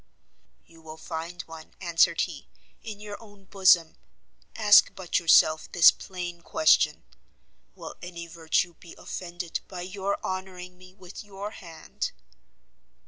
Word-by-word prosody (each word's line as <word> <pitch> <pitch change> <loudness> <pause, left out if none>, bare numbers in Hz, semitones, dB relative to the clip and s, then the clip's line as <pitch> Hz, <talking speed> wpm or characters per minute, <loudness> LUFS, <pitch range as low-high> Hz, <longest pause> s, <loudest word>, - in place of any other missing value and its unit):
"You 165 -1 -19
will 160 0 -11
find 165 +2 -6
one," 160 -1 -13
answered 170 -1 +2
he, 155 -6 -5 0.3
"in 215 -3 -8
your 210 +1 -9
own 205 -3 -17
bosom; 185 -4 +3 0.6
ask 210 -2 +6
but 185 -2 -1
yourself 155 -2 +4
this 175 - +8
plain 175 -2 -7
question; 315 - +3 0.7
will - - -9
any 170 -1 -8
virtue 170 +1 -1
be 170 0 -15
offended 175 -1 -6
by 180 -2 -7
your 195 +2 -3
honouring 185 -1 -6
me 180 +1 -17
with 185 +1 -11
your 205 0 -7
hand?" 165 -6 -7
180 Hz, 130 wpm, -26 LUFS, 170-195 Hz, 0.7 s, this